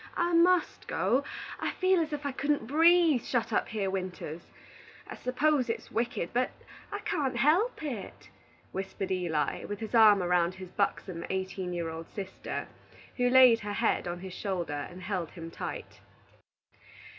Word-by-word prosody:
I 345 0 +1
must 350 +1 +3
go; 265 +3 +1 0.4
I - - -2
feel 370 -1 +3
as 320 -2 -1
if 295 -1 -4
I 280 - 0
couldn't 285 -2 0
breathe, 325 0 +5
shut 240 -3 -1
up - - +1
here 210 -3 -2
winters. 180 -4 -4 0.6
I - - -8
s'pose 260 0 +1
it's 230 - -4
wicked, 230 -7 -1
but 250 +1 +2 0.4
I 410 - -4
can't 270 -6 -1
help 320 - +2
it," 225 - -6 0.4
whispered 190 0 -4
Eli, 170 -5 -1
with 205 - -5
his 220 0 -6
arm 215 -4 +7
around 175 0 +2
his 185 -1 -10
buxom 185 -4 -1
eighteen 190 -1 -3
year 170 -2 -2
old 160 0 -7
sister, 195 -2 -5 0.5
who 245 -1 +3
laid 250 -2 +7
her 205 -1 -4
head 225 -3 +1
on 175 0 -4
his 190 -1 -7
shoulder 170 -8 -3
and 180 +1 -11
held 180 -4 -2
him 165 -2 -8
tight. - - -6
215 Hz, 160 wpm, -30 LUFS, 180-280 Hz, 0.6 s, arm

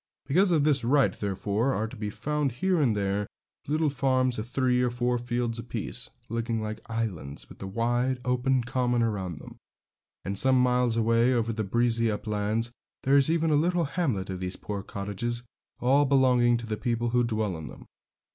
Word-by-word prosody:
Because 185 +6 +3
of 155 -4 +3
this 140 -4 +2
right, 135 +3 +3
therefore, 105 +5 -1
are 110 +2 -1
to 115 - -10
be 105 -2 -4
found 150 +4 -1
here 180 +6 +1
and 120 -7 +2
there 100 0 -1 0.4
little 155 +1 +1
farms 130 -3 +1
of 110 - -4
three 125 0 +1
or 125 - +2
four 120 0 0
fields 120 -1 -2
a - - -5
piece, - - -4 0.2
looking 115 0 -2
like 110 0 -5
islands, 100 -11 -3
with - - -14
the 95 - -5
wide, 120 +5 0
open 125 0 +1
common 125 -1 0
around 95 -7 -2
them; - - -11 0.7
and 100 +2 0
some 130 -1 +5
miles 125 -2 +2
away 115 +2 +3
over 115 -1 0
the 110 0 -2
breezy 115 +2 +1
uplands 105 +2 -1 0.3
there 135 +1 +3
is 140 +1 +5
even 165 -1 +2
a - - +4
little 170 +3 +2
hamlet 125 - -1
of 95 - -4
these 90 0 -3
poor 100 -1 -5
cottages, 105 +5 -4 0.4
all 140 +4 +4
belonging 125 -3 +4
to 120 - -6
the 110 -1 -3
people 120 0 -1
who 120 +1 +2
dwell 110 -5 -1
in 80 -1 -7
them. - - -11
120 Hz, 190 wpm, -27 LUFS, 110-130 Hz, 0.7 s, some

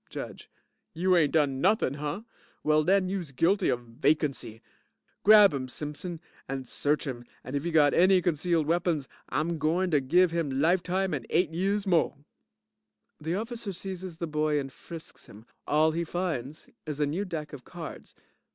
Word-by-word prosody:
JUDGE - - -8 0.5
You 180 +3 +3
ain't 155 -5 +3
done 140 -4 +2
nothin', 190 -7 +2
hunh? 150 +9 -4 0.4
Well 155 0 +3
den 190 +2 +3
youse 180 -6 -3
guilty 170 +10 +2
of 125 -2 0
vacancy. 125 -1 -1 0.6
Grab 210 -4 +8
'im, 130 -2 -3
Simpson, 150 +6 -6 0.3
and 135 -2 -4
search 150 +5 0
'im 125 -4 -5 0.2
and 130 +3 -6
if 140 - -1
he 170 - -1
got 150 -3 +4
any 185 +2 +5
concealed 170 -1 +1
weapons, 165 -3 0 0.2
I'm 160 +3 -1
gointer 165 +1 +2
give 170 +6 +3
'im 145 -6 -1
life 170 +5 +3
time 185 +1 -1
and 130 -6 -4
eight 170 -1 +2
years 195 +4 0
mo'. 170 -6 +2 1.0
(The 160 +3 -2
OFFICER 225 -1 -4
seizes 185 -2 -7
the 170 - -3
boy 150 -1 0
and 135 -2 -6
frisks 165 -2 -10
him. 105 +2 -14 0.2
All 155 +2 +3
he 170 +2 -1
finds 160 -5 -4 0.2
is 150 -1 -4
a 150 - +3
new 160 +8 -2
deck 160 -6 -5
of 135 -3 -9
cards. 170 -3 -9
160 Hz, 170 wpm, -28 LUFS, 145-180 Hz, 1.0 s, Grab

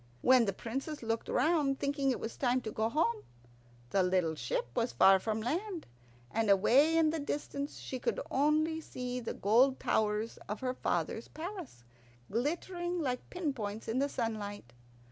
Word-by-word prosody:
When 255 -2 +6
the 200 - +1
Princess 270 - -5
looked 225 0 -2
round, 300 -4 +2
thinking 280 -1 0
it 255 - 0
was 225 - -5
time 250 -1 +2
to 220 - -5
go 220 +1 0
home, 285 -3 +1 0.7
the 195 - +3
little 180 -3 +2
ship - - -2
was 235 0 0
far 195 0 +6
from 220 +2 -2
land, 345 - -2 0.5
and 225 -1 0
away 260 +11 +5
in 315 -1 +4
the 320 - -2
distance 285 0 -4
she 260 - -5
could - - -1
only 310 +3 +2
see 250 -4 -4
the 235 - -5
gold 250 +6 +4
towers 215 +1 0
of 210 - -4
her 255 -1 -1
father's 175 0 -2
palace, 330 - -7 0.5
glittering 345 - -1
like 255 -5 -2
pin 335 -6 -2
points 215 -3 -5
in 230 +3 0
the 280 +1 +1
sunlight. 205 - -4
255 Hz, 165 wpm, -32 LUFS, 220-305 Hz, 0.7 s, When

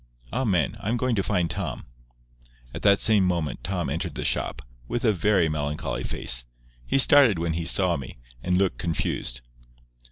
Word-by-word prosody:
"Amen. 95 - 0
I'm 115 +4 -2
going 125 0 0
to 100 - +1
find 90 -4 0
Tom." 75 - -5 0.9
At - - -6
the 100 -1 +5
same 105 -1 +3
moment 85 -4 -2
Tom 90 -1 -2
entered - - -4
the - - -4
shop, - - -1 0.2
with 120 - -3
a 110 - +4
very 95 -1 +2
melancholy 75 -1 -3
face. - - +3 0.4
He - - +1
started 135 -6 +6
when 85 0 -2
he 85 0 -3
saw 90 0 +3
me, 65 -3 -9 0.2
and 90 +5 0
looked 95 -1 0
confused. 70 -6 -2
90 Hz, 165 wpm, -25 LUFS, 80-105 Hz, 0.9 s, started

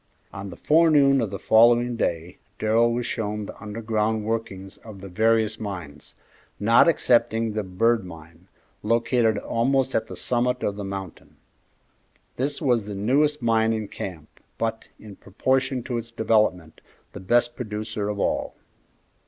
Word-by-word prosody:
On 100 0 -7
the - - -9
forenoon 150 -4 +4
of 110 - -1
the 100 - -5
following 120 +3 +4
day 85 -5 -3 0.2
Darrell 115 +2 +2
was 120 0 -2
shown 105 -2 -3
the - - -9
underground 110 0 -2
workings 105 -4 -4
of 110 -3 -12
the 100 - -9
various 110 +2 +1
mines, 85 -9 -8 0.4
not 115 +7 +5
excepting 115 -7 +2
the 110 - -1
Bird 110 +4 +1
Mine, 85 0 -13 0.3
located 115 0 +1
almost 130 +5 0
at - - 0
the - - -8
summit 125 +1 -1
of 100 - -1
the 100 - -6
mountain. 95 -2 -8 1.0
This 140 +3 -2
was 120 -7 +1
the 105 -1 -6
newest 140 +7 +1
mine 115 -1 +2
in 110 -2 -3
camp, 85 -7 -8 0.2
but, 115 0 -3
in 105 -2 -12
proportion 130 +5 -1
to 120 -1 -3
its 115 0 -9
development, 110 -7 0 0.3
the - - -8
best 120 +5 +1
producer 105 -2 -4
of 105 -1 -4
all. - - -1
110 Hz, 150 wpm, -24 LUFS, 100-120 Hz, 1.0 s, not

